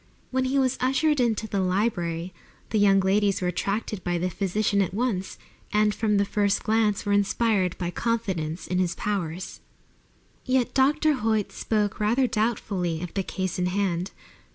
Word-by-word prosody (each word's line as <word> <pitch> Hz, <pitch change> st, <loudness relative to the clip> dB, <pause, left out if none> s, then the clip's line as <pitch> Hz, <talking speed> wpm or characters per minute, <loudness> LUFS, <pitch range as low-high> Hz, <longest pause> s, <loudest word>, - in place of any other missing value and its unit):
When 260 Hz, 0 st, +1 dB
he 265 Hz, +2 st, 0 dB
was 265 Hz, -1 st, +1 dB
ushered 280 Hz, +3 st, +2 dB
into 225 Hz, -3 st, +1 dB
the 200 Hz, -2 st, -1 dB
library 180 Hz, -3 st, -1 dB, 0.4 s
the 220 Hz, -, +2 dB
young 195 Hz, -1 st, +5 dB
ladies 200 Hz, +1 st, +2 dB
were 180 Hz, -, 0 dB
attracted 200 Hz, +1 st, -2 dB
by 175 Hz, 0 st, 0 dB
the 180 Hz, +2 st, -1 dB
physician 200 Hz, +2 st, 0 dB
at 190 Hz, -1 st, -2 dB
once, 210 Hz, -5 st, -2 dB, 0.3 s
and 210 Hz, 0 st, +3 dB
from 210 Hz, 0 st, +1 dB
the 200 Hz, -, +3 dB
first 200 Hz, 0 st, 0 dB
glance 215 Hz, -2 st, +1 dB
were 205 Hz, -, +1 dB
inspired 200 Hz, -2 st, +1 dB
by 175 Hz, -1 st, -3 dB
confidence 190 Hz, -8 st, -2 dB
in 180 Hz, -, -1 dB
his 180 Hz, -2 st, 0 dB
powers. 185 Hz, -4 st, -3 dB, 0.8 s
Yet 255 Hz, -2 st, +1 dB
Dr. 300 Hz, +3 st, +3 dB
Hoyt 220 Hz, -5 st, 0 dB
spoke 210 Hz, -2 st, -1 dB
rather 230 Hz, +5 st, +2 dB
doubtfully 200 Hz, -7 st, -1 dB
of 175 Hz, -, -6 dB
the 195 Hz, -, 0 dB
case 185 Hz, -1 st, -3 dB
in 180 Hz, -, +1 dB
hand. 185 Hz, -1 st, -1 dB
205 Hz, 165 wpm, -25 LUFS, 185-225 Hz, 0.8 s, young